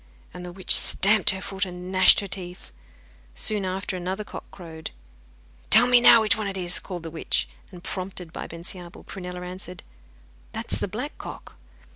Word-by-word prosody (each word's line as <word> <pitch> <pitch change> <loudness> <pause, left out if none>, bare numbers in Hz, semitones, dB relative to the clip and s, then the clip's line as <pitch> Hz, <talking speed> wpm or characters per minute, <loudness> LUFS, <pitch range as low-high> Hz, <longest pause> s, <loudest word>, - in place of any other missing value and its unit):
And 180 - -9
the 180 - -7
witch 185 +1 +2
stamped 210 +1 +5
her 190 0 0
foot 195 0 -3
and 180 -1 -6
gnashed 185 +1 +6
her 200 - -6
teeth. 180 -1 -8 0.6
Soon 210 -3 0
after 185 +1 -3
another 185 +3 -4
cock - - -10
crowed. 160 -3 -9 0.8
'Tell 225 +3 +9
me 245 -1 +5
now 230 -1 +8
which 215 -1 +4
one 215 -2 -3
it 195 -1 -4
is,' 180 -1 0
called 180 -4 -8
the 165 - -7
witch. 160 - -1 0.2
And, 175 -1 -12
prompted 185 -3 -5
by - - -6
Bensiabel, 175 +1 -9
Prunella 180 -1 -8
answered: 180 0 -8 0.7
'That 225 +1 -4
is - - +2
the - - -2
black 245 +10 -6
cock. - - -9
185 Hz, 180 wpm, -24 LUFS, 180-200 Hz, 0.8 s, Tell